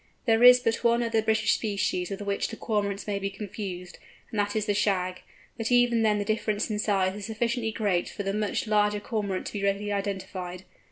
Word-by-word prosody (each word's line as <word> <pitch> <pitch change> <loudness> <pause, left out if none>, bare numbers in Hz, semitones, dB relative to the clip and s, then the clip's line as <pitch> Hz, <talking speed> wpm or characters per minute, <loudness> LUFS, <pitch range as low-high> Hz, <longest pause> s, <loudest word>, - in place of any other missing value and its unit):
There 225 -2 +3
is 250 0 +9
but 230 -2 -1
one 235 0 +3
other 225 -1 +1
British 220 -1 +2
species 200 -4 -1
with 195 0 -5
which 200 0 -1
the 225 - -7
Cormorant 205 -3 -2
may 200 -1 -2
be 195 0 -2
confused, 195 -3 -7 0.3
and 220 - -2
that 205 +1 0
is 215 -1 0
the 205 - +1
Shag; 185 -3 0 0.4
but 225 +1 -2
even 245 -1 +4
then 215 -1 +3
the 205 - -2
difference 215 0 -1
in 210 - -1
size 195 -3 +1
is 205 0 -6
sufficiently 230 +1 -1
great 200 -5 0
for 200 - -5
the 195 0 -2
much 210 +5 -1
larger 210 -1 +2
Cormorant 205 -4 -3
to - - -6
be 205 -2 -3
readily 200 +1 0
identified. 190 -2 -4
210 Hz, 210 wpm, -27 LUFS, 195-220 Hz, 0.4 s, is